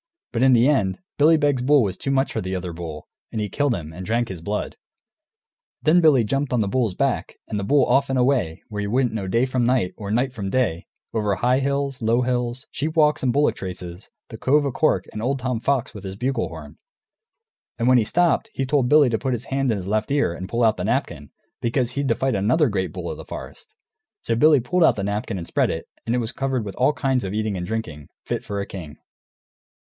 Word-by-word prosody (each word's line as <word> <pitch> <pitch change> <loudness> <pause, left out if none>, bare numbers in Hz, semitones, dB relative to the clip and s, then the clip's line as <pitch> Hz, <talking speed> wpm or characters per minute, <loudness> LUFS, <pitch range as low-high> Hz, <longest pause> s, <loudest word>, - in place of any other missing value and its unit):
But 115 - -1
in 130 0 +6
the 120 +1 +5
end, 105 -11 +2 0.2
Billy 160 +3 +6
Beg's 145 -4 +1
bull 140 +1 +4
was 95 -3 -2
too - - -4
much 135 0 +1
for - - -2
the 95 +1 -3
other 90 -1 -4
bull, 80 -3 -7 0.2
and 110 - -3
he 105 -1 -2
killed 145 +4 +1
him, 80 -3 -7
and 90 +3 -7
drank 115 +4 0
his 90 -4 -7
blood. 105 +5 -3 1.1
Then 165 +3 +5
Billy 145 -7 +5
jumped 135 +5 -1
on 120 - +2
the 100 - 0
bull's 115 -5 0
back, - - -1
and 105 - -3
the - - -3
bull 140 +3 +4
off 135 +2 +2
and 135 - 0
away, 125 -11 +1
where 105 -1 -4
you 100 - -3
wouldn't 125 0 +1
know 100 -4 -3
day 115 +6 +2
from 130 -1 0
night 120 -7 +1
or 100 -2 -6
night 125 +5 +1
from 100 -5 -4
day, 110 -9 0 0.3
over 105 -3 0
high 125 +5 +2
hills, 140 -1 -1
low 115 +2 +2
hills, 125 0 -1
sheep 155 +3 -3
walks 150 -2 +3
and 125 -3 +1
bullock 145 +1 +2
traces, 90 0 -7 0.2
the 110 - -8
Cove 145 +5 +2
o' 140 - 0
Cork, 155 +5 +1
and 110 - -6
old 135 +4 0
Tom 125 -2 -2
Fox 130 0 0
with 105 -3 -9
his 95 0 -5
bugle 130 +6 -1
horn. - - -10 1.0
And 120 - 0
when 130 - +6
he - - +2
stopped 175 +7 +2
he 135 - -1
told 135 -2 +1
Billy 150 -2 +6
to 110 - 0
put 130 -1 -1
his 120 +1 -4
hand 135 -1 -1
in 110 - +2
his 95 -2 -5
left 105 +1 0
ear 140 -11 +1
and 95 +2 -7
pull 120 +1 0
out 110 -1 +3
the - - -3
napkin, - - -2 0.3
because 120 +1 0
he'd 140 +1 -2
to - - +2
fight 135 -1 0
another 125 - +2
great 95 -3 -2
bull - - -5
of - - -7
the - - -9
forest. - - -10 0.5
So 115 - 0
Billy 150 +2 +5
pulled 175 +9 +1
out - - +4
the 100 - -3
napkin 100 +1 -2
and 85 - -5
spread - - +1
it, - - -4 0.2
and 115 - +1
it - - +1
was 115 -1 -2
covered 135 -2 -2
with 100 - -6
all 130 +4 +3
kinds 130 -2 0
of 95 - -4
eating 110 -2 -1
and 90 0 -4
drinking, 80 -10 -5 0.2
fit - - -3
for 100 -1 -3
a - - -3
king. 85 -8 -9
120 Hz, 245 wpm, -23 LUFS, 100-135 Hz, 1.1 s, in